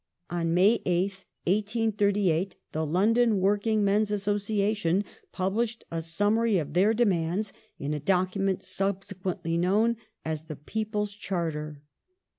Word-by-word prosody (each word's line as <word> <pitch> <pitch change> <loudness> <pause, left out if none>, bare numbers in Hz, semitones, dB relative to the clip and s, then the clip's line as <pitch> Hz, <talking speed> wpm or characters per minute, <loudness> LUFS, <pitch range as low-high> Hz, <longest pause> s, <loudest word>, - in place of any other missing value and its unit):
On 170 -1 0
May 200 +6 +5
8th, 190 +2 -1 0.2
1838, 200 -3 +1 0.2
the 155 - -1
London 215 +6 +3
Working 205 +2 +2
Men's 205 +2 +2
Association 205 -2 0 0.3
published 215 +5 -1
a 165 0 -2
summary 205 +6 +2
of 150 -4 -3
their 190 +5 +4
demands 195 -3 +1 0.2
in 145 +2 -3
a 150 - -2
document 185 +3 +1
subsequently 185 -3 -2
known 215 +6 +2 0.3
as 155 -1 -3
The 155 -2 -6
People's 210 +6 -3
Charter. 160 -7 -4
195 Hz, 115 wpm, -28 LUFS, 175-210 Hz, 0.3 s, May